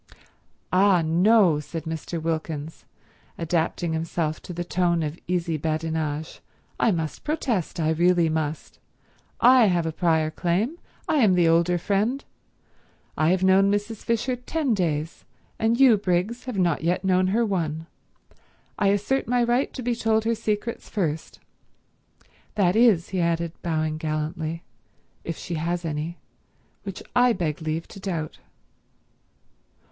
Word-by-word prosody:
"Ah 185 Hz, -2 st, +4 dB
no," 180 Hz, 0 st, +4 dB
said 160 Hz, +2 st, -6 dB
Mr. 160 Hz, +1 st, -4 dB
Wilkins, 160 Hz, -1 st, -4 dB, 0.5 s
adapting 165 Hz, 0 st, -1 dB
himself 160 Hz, -1 st, -2 dB
to -, -, -9 dB
this 175 Hz, 0 st, -4 dB
tone 175 Hz, -2 st, +1 dB
of 150 Hz, +2 st, -4 dB
easy 170 Hz, -2 st, -1 dB
badinage, 155 Hz, 0 st, -3 dB, 0.4 s
"I -, -, +3 dB
must 160 Hz, -6 st, -2 dB
protest. 240 Hz, -, -2 dB
I 160 Hz, -1 st, +1 dB
really 175 Hz, +1 st, +3 dB
must. 155 Hz, -1 st, -3 dB, 0.6 s
I 250 Hz, -2 st, +6 dB
have 175 Hz, -3 st, +1 dB
a 160 Hz, -, -1 dB
prior 160 Hz, -2 st, +1 dB
claim, 200 Hz, -, -1 dB, 0.3 s
I 320 Hz, -2 st, +2 dB
am 215 Hz, -9 st, +4 dB
the 175 Hz, -2 st, +4 dB
older 170 Hz, +2 st, +3 dB
friend. 210 Hz, +9 st, -1 dB, 0.9 s
I 155 Hz, +1 st, +2 dB
have 185 Hz, +1 st, +2 dB
known 190 Hz, +1 st, +5 dB
Mrs. 205 Hz, +2 st, -2 dB
Fisher 235 Hz, +4 st, -1 dB
ten 265 Hz, +2 st, -1 dB
days, 160 Hz, -5 st, -2 dB, 0.4 s
and 230 Hz, +2 st, +1 dB
you, 255 Hz, -5 st, +7 dB
Briggs, 195 Hz, +5 st, -1 dB
have 250 Hz, -5 st, -4 dB
not 175 Hz, -5 st, +1 dB
yet 175 Hz, +3 st, 0 dB
known 185 Hz, -1 st, +3 dB
her 225 Hz, +5 st, +2 dB
one. 165 Hz, -6 st, -2 dB, 0.9 s
I 200 Hz, -, +3 dB
assert 205 Hz, +7 st, +1 dB
my 245 Hz, 0 st, +2 dB
right 240 Hz, +3 st, +1 dB
to 255 Hz, -, -7 dB
be 245 Hz, +1 st, 0 dB
told 220 Hz, -1 st, +1 dB
her 230 Hz, -, +2 dB
secrets 215 Hz, +1 st, -3 dB
first. 160 Hz, -7 st, -3 dB, 1.2 s
That 190 Hz, -3 st, +2 dB
is," 220 Hz, -7 st, +4 dB
he 185 Hz, -2 st, -1 dB
added, 170 Hz, 0 st, 0 dB
bowing 155 Hz, -2 st, -1 dB
gallantly, 155 Hz, +1 st, -3 dB, 0.6 s
"if 165 Hz, -, -5 dB
she 175 Hz, -, -6 dB
has 170 Hz, +1 st, -2 dB
any—which 165 Hz, +4 st, -8 dB
I 245 Hz, -1 st, +5 dB
beg 165 Hz, -5 st, -2 dB
leave 160 Hz, +1 st, -3 dB
to -, -, -11 dB
doubt." 170 Hz, -6 st, -4 dB
175 Hz, 140 wpm, -24 LUFS, 160-210 Hz, 1.2 s, you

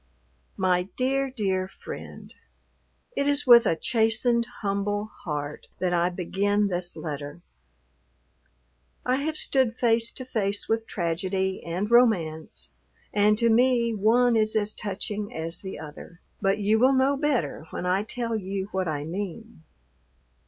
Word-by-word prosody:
MY 185 Hz, -1 st, +1 dB
DEAR, 270 Hz, +1 st, 0 dB
DEAR 190 Hz, -7 st, -1 dB
FRIEND, -, -, -10 dB, 0.8 s
It 280 Hz, -, 0 dB
is 285 Hz, 0 st, +2 dB
with 240 Hz, -2 st, +8 dB
a -, -, +2 dB
chastened, 235 Hz, +4 st, +2 dB
humble 205 Hz, +1 st, -1 dB
heart 150 Hz, -2 st, -4 dB
that 180 Hz, -1 st, 0 dB
I 175 Hz, 0 st, +2 dB
begin 200 Hz, +3 st, 0 dB
this 175 Hz, -1 st, -3 dB
letter; 145 Hz, +2 st, -6 dB, 1.6 s
I 255 Hz, +1 st, +2 dB
have 310 Hz, +3 st, -2 dB
stood 255 Hz, -4 st, +1 dB
face 230 Hz, -1 st, +2 dB
to 255 Hz, -, -7 dB
face 205 Hz, -5 st, -1 dB
with 225 Hz, 0 st, 0 dB
tragedy 190 Hz, +2 st, -2 dB
and 185 Hz, +6 st, -3 dB
romance, 180 Hz, -10 st, +2 dB, 0.4 s
and 210 Hz, +1 st, +4 dB
to 230 Hz, 0 st, +3 dB
me 235 Hz, 0 st, +3 dB
one 230 Hz, +4 st, +3 dB
is 215 Hz, 0 st, +2 dB
as 210 Hz, -1 st, 0 dB
touching 205 Hz, +1 st, -4 dB
as 165 Hz, +2 st, -2 dB
the 190 Hz, -1 st, -6 dB
other, 155 Hz, +3 st, -10 dB, 0.2 s
but 195 Hz, +1 st, +2 dB
you 210 Hz, +1 st, +2 dB
will 260 Hz, +3 st, +5 dB
know 265 Hz, +2 st, +3 dB
better 270 Hz, -, -1 dB
when -, -, -5 dB
I 185 Hz, +2 st, +2 dB
tell 230 Hz, +2 st, -3 dB
you 195 Hz, -1 st, -3 dB
what 190 Hz, -1 st, -1 dB
I 150 Hz, -2 st, -2 dB
mean. 200 Hz, +5 st, -6 dB
205 Hz, 140 wpm, -26 LUFS, 180-235 Hz, 1.6 s, with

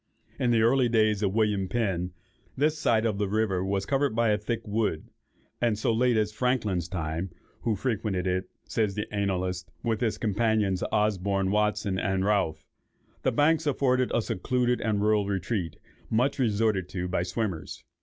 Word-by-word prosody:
In 125 Hz, -, +2 dB
the 115 Hz, -2 st, +4 dB
early 125 Hz, +1 st, +4 dB
days 110 Hz, -2 st, +2 dB
of 100 Hz, -1 st, 0 dB
William 105 Hz, -4 st, +1 dB
Penn, 95 Hz, -6 st, -1 dB, 0.5 s
this 150 Hz, +3 st, +2 dB
side 115 Hz, -6 st, +2 dB
of 105 Hz, -3 st, 0 dB
the 100 Hz, -2 st, 0 dB
river 100 Hz, -3 st, +1 dB
was 95 Hz, 0 st, -1 dB
covered 135 Hz, -2 st, +1 dB
by 115 Hz, -1 st, +3 dB
a 105 Hz, -, +3 dB
thick 115 Hz, +2 st, -3 dB
wood; 105 Hz, -7 st, -1 dB, 0.5 s
and 115 Hz, -3 st, +2 dB
so 110 Hz, -, +1 dB
late 120 Hz, 0 st, +3 dB
as 105 Hz, -1 st, +1 dB
Franklin's 105 Hz, -7 st, 0 dB
time, 85 Hz, 0 st, -3 dB, 0.3 s
(who 115 Hz, -3 st, 0 dB
"frequented 105 Hz, -4 st, -1 dB
it," 95 Hz, 0 st, 0 dB, 0.2 s
says 105 Hz, -4 st, 0 dB
the 105 Hz, -, -2 dB
annalist, 90 Hz, -3 st, -1 dB
"with 115 Hz, -2 st, -1 dB
his 115 Hz, -3 st, 0 dB
companions, 105 Hz, -3 st, +1 dB
Osborne, 100 Hz, -2 st, +1 dB
Watson, 105 Hz, -2 st, +1 dB
and 95 Hz, -1 st, 0 dB
Ralph,") 100 Hz, -6 st, 0 dB, 0.6 s
the -, -, +1 dB
banks 155 Hz, +2 st, +2 dB
afforded 130 Hz, -3 st, +2 dB
a 115 Hz, -, +1 dB
secluded 125 Hz, +6 st, 0 dB
and 105 Hz, -2 st, 0 dB
rural 105 Hz, -1 st, +2 dB
retreat, 95 Hz, -3 st, -2 dB, 0.3 s
much 130 Hz, +6 st, +1 dB
resorted 110 Hz, -5 st, +1 dB
to 90 Hz, -1 st, -3 dB
by 90 Hz, -1 st, 0 dB
swimmers. 90 Hz, -3 st, -3 dB
105 Hz, 165 wpm, -27 LUFS, 95-115 Hz, 0.6 s, the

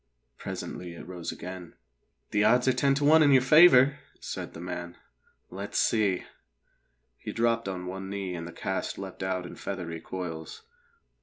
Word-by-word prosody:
Presently 90 Hz, -1 st, -6 dB
it 85 Hz, -, -10 dB
rose 90 Hz, -2 st, -5 dB
again. 90 Hz, -1 st, -8 dB, 0.6 s
"The 105 Hz, 0 st, +2 dB
odds 125 Hz, +4 st, +4 dB
are 130 Hz, -, +5 dB
ten 135 Hz, +2 st, +2 dB
to 145 Hz, +1 st, 0 dB
one 160 Hz, +2 st, +7 dB
in 150 Hz, -, +6 dB
your 130 Hz, -2 st, +6 dB
favour," 140 Hz, -2 st, +7 dB, 0.2 s
said -, -, -6 dB
the -, -, -8 dB
man. 90 Hz, 0 st, -6 dB, 0.5 s
"Let's 100 Hz, +2 st, -5 dB
see!" 100 Hz, -5 st, +2 dB, 1.0 s
He -, -, -6 dB
dropped 115 Hz, -1 st, +1 dB
on 90 Hz, -1 st, -4 dB
one 95 Hz, +1 st, -6 dB
knee 100 Hz, -2 st, -4 dB
and 85 Hz, -1 st, -5 dB
the -, -, -8 dB
cast 95 Hz, +2 st, -3 dB
leapt 95 Hz, -1 st, -8 dB
out 95 Hz, -1 st, -2 dB
in -, -, -8 dB
feathery 85 Hz, -4 st, -5 dB
coils. 90 Hz, -, -6 dB
95 Hz, 165 wpm, -28 LUFS, 90-125 Hz, 1.0 s, one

